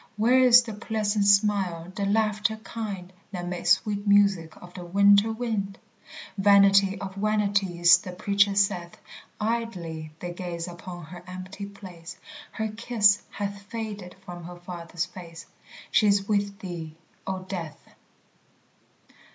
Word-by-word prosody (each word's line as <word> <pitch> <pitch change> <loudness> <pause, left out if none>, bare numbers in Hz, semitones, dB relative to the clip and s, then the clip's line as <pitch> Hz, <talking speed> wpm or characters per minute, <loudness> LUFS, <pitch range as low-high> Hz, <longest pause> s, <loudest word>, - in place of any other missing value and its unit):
Where 240 +4 +4
is 245 -1 +7
the 225 -2 -7
pleasant 210 -1 -1
smile, 195 -4 +2
the 200 0 -1
laughter 215 +1 +1
kind, 200 -5 -6 0.2
That 180 -3 -5
made 180 0 -4
sweet 205 +2 +2
music 200 -5 +3
of 180 0 -14
the 180 - -8
winter 200 +4 +4
wind? 220 -4 -3 0.6
Vanity 200 0 +5
of 190 -1 -6
vanities 200 -4 +3
the 185 - -8
Preacher 200 +2 +2
saith 180 -3 0 0.4
Idly 185 -9 -3
they 175 -1 -5
gaze 175 -1 -5
upon 175 -1 -9
her 175 +2 -11
empty 185 +2 -7
place, 185 -4 -11 0.4
Her 220 -1 -2
kiss 215 -2 +3
hath 200 0 -5
faded 205 -3 -7
from 175 -2 -8
her 175 +1 -8
Father's 175 -1 -5
face 175 -3 -11 0.5
She 215 - +4
is 200 -1 +2
with 200 -1 0
thee, 170 -5 -7 0.3
O 190 -1 -3
Death. 180 -5 -7
195 Hz, 135 wpm, -26 LUFS, 175-210 Hz, 0.6 s, is